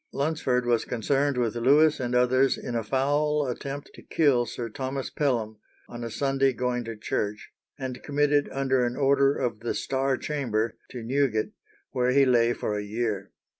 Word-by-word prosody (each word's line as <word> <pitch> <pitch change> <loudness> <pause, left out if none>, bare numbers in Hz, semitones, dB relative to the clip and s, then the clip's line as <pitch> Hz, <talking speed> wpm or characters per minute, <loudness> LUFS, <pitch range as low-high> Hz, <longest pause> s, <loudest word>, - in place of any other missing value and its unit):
Lunsford 140 -4 0
was 120 -2 +2
concerned 135 +4 0
with 120 -2 0
Lewis 145 +6 +4
and 125 -1 -2
others 130 +2 +3
in 125 - -6
a 115 - 0
foul 145 +4 +1
attempt 140 +3 -5
to - - -13
kill 135 -7 +2
Sir 120 - -5
Thomas 130 +3 -4
Pelham, 115 -7 -1 0.3
on 120 0 -8
a 115 - -4
Sunday 135 +3 +1
going 125 -1 -1
to 115 0 -5
church, 105 0 -3 0.3
and 130 -2 -5
committed 145 0 +1
under 130 -2 +1
an 120 0 -1
order 140 0 +3
of 120 -5 -2
the 115 +1 -3
Star 135 0 0
Chamber 115 -7 -2
to 120 -2 -7
Newgate, 125 -3 0 0.4
where 125 0 +1
he 140 0 +5
lay 120 -2 +4
for 105 -3 -2
a - - -4
year. 105 -2 -3
130 Hz, 170 wpm, -26 LUFS, 120-140 Hz, 0.4 s, he